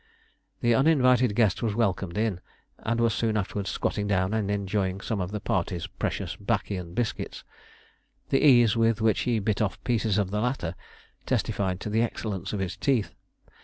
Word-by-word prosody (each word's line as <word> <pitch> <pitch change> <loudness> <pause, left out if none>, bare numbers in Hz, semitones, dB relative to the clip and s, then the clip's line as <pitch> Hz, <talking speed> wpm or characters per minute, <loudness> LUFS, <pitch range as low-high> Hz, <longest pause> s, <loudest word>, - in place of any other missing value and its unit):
The 120 -1 +3
uninvited 125 -4 +4
guest 110 -5 +2
was 110 -3 -1
welcomed 95 -5 0
in, 105 -5 0 0.4
and 115 +1 -1
was 115 -1 +3
soon 110 -1 0
afterwards 100 -1 -2
squatting 105 +2 -1
down 95 0 +1
and 110 -3 0
enjoying 100 -1 -1
some 100 0 -2
of 90 - -2
the 105 +1 -4
party's 90 -3 -1
precious - - -3
'baccy 105 -1 -1
and 90 -2 -7
biscuits. 120 -2 -3 0.9
The 135 - +3
ease 120 -6 +6
with 115 -1 +2
which 110 -2 +2
he 120 - +2
bit 105 0 0
off 100 -2 0
pieces 110 -4 +1
of 100 -2 0
the 105 +1 0
latter 120 -9 -1 0.5
testified 95 -2 0
to 105 - -4
the 110 +2 +2
excellence 105 -5 -3
of 105 - -3
his 95 -1 -3
teeth. 105 - 0
105 Hz, 175 wpm, -27 LUFS, 95-115 Hz, 0.9 s, ease